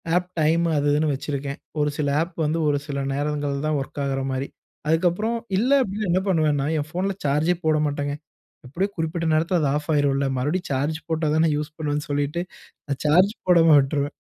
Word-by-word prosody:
App 180 0 0
time 165 +2 +3
அது 145 0 +1
இதுன்னு 150 0 +2
வச்சிருக்கேன். 140 +1 -4 0.2
ஒரு 150 0 +2
சில 145 -2 0
ஆப் 170 +2 -4
வந்து 160 +2 0
ஒரு 145 -1 +2
சில 140 -1 -3
நேரங்கள்தான் 145 +1 -1
ஒர்க் 140 +1 -6
ஆகிற 135 -1 -1
மாரி. 130 +1 -2 0.4
அதுக்கப்புறம், 180 +8 +1 0.2
இல்ல 245 +6 +1
அப்பிடின்னா 205 -1 -3
என்ன 185 +2 +2
பண்ணுவேன்னா, 150 -5 +2
என் 145 - -4
ஃபோன்ல 190 +2 -1
சார்ஜே 150 +5 +2
போட 155 -1 +3
மாட்டேங்க. 145 0 -2 0.5
எப்பிடியோ 185 +10 -1
குறிப்பிட்ட 165 +1 -2
நேரத்தில 165 +3 +2
அது 145 - +2
ஆஃப் 150 +2 -4
ஆகிரும்ல. 140 -1 +2
மறுபடியும் 155 +7 -1
சார்ஜ் 145 +4 -1
போட்டா 160 -1 0
தானே 160 0 +3
யூஸ் 150 +1 -5
பண்ணுவேன்னு 150 -1 -2
சொல்லிட்டு, 145 +4 -1 0.5
நான் 140 -2 -3
சார்ஜ் 180 +8 +4
போடாம 165 -3 +6
விட்டுருவேன். 140 +1 -1
150 Hz, 175 wpm, -23 LUFS, 145-170 Hz, 0.5 s, போடாம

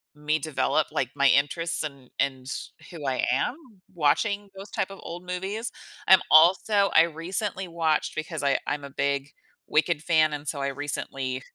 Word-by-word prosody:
me 150 +1 0
develop 155 +1 0
like 130 - -1
my 140 -1 +4
interests 165 +5 +1
and 140 -4 -8
and 130 -2 -1 0.4
who 155 -4 -8
I 130 -1 0
am 135 - 0 0.4
watching 200 +6 +1
those 195 +1 -9
type 195 - -2
of 195 - -10
old 175 +2 -8
movies. 195 +6 -4 0.4
I'm 190 -1 +8
also 190 +5 +5
I - - +8
recently 185 +4 -3
watched 165 -2 0
because 155 -1 -4
I 140 -1 +2
I'm 145 -1 -2
a 140 - -8
big 140 0 -1 0.4
Wicked 155 0 +1
fan 155 -2 +3
and 145 0 -6
so 140 -1 -2
I 140 - 0
recently 135 -2 -4
155 Hz, 165 wpm, -26 LUFS, 140-180 Hz, 0.4 s, I'm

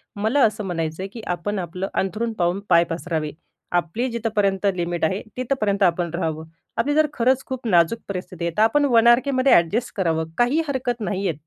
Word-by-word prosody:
मला 220 +7 +1
असं 215 0 -1
म्हणायचं 165 -2 -3
आहे, - - -3
की 225 +3 -9
आपण 200 +4 -3
आपलं 180 +2 -4
अंथरूण 220 +4 -1
पाहून 175 +2 +1
पाय 170 -1 +6
पसरावे. 165 -2 -3 0.5
आपली 195 +9 -3
जिथपर्यंत 210 -4 0
लिमिट 175 -1 -2
आहे 190 +5 -1 0.2
तिथपर्यंत 215 -6 0
आपण 175 -1 +2
राहावं. 160 -2 -3 0.3
आपली 275 +6 +1
जर 310 0 +4
खरंच 260 +1 +2
खूप 260 -2 -5
नाजूक 175 +3 +3
परिस्थिती 180 -2 -5
आहे, 170 - -2
तर - - +3
आपण 290 +6 +3
1 230 0 +6
आर-केमध्ये 255 +2 +4
एडजस्ट 200 +9 0
करावं. 165 -4 0
काही 245 +6 +3
हरकत 255 -4 -2
नाहीये. 195 -4 -1
200 Hz, 180 wpm, -22 LUFS, 175-235 Hz, 0.5 s, पाय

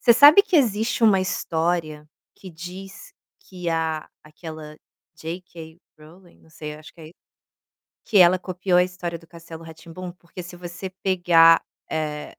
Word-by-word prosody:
você 235 - +6
sabe 295 - +8
que 380 -5 +1
existe 225 -2 +1
uma 195 -4 +5
história 160 -4 -2 0.3
que 190 - -12
diz 185 +4 -10 0.3
que 180 -2 -7
a 160 -1 -2 0.2
aquela 155 -1 -10 0.4
J 165 +3 -7
K 165 -3 -12 0.2
Rowling, 170 +4 -18
não 160 - -23
sei, 150 -1 -8
acho 155 +1 -13
que 170 - -17
é 155 0 -11 0.9
que 210 - +1
ela 180 0 +7
copiou 180 0 -1
a 180 - +6
história 180 -2 -5
do 165 0 -20
castelo 165 -1 -12
Ra 160 0 -10
Tim 160 +1 -15
Bum, 180 +1 -7
porque 180 0 -11
se 175 +1 -10
você 175 +2 -7
pegar, 175 -3 +4 0.3
eh 150 -1 -3
175 Hz, 165 wpm, -23 LUFS, 160-185 Hz, 0.9 s, sabe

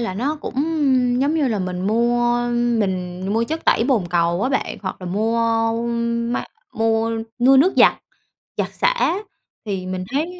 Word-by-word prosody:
là 210 -6 -3
nó 280 +9 -1
cũng - - -6 0.7
giống 285 +4 +1
như 295 -5 +1
là 215 -3 -1
mình 185 -1 -3
mua 240 +2 +2
mình 190 -7 -1
mua 225 +2 +1
chất 320 +6 -4
tẩy 230 - +3
bồn 245 -9 +1
cầu 170 +2 +1
á 255 - +1
bạn, 270 - -2
hoặc 185 - -4
là 180 - -7
mua 225 +3 +1 0.6
máy 245 - -3 0.2
mua 225 0 +1 0.3
mua 265 +2 +5
nước 345 +8 +5
giặt - - +6 0.6
giặt - - -2
xả - - +1 0.5
thì 190 -3 -3
mình 185 0 -4
thấy, 335 +6 -2
230 Hz, 165 wpm, -21 LUFS, 190-260 Hz, 0.7 s, giặt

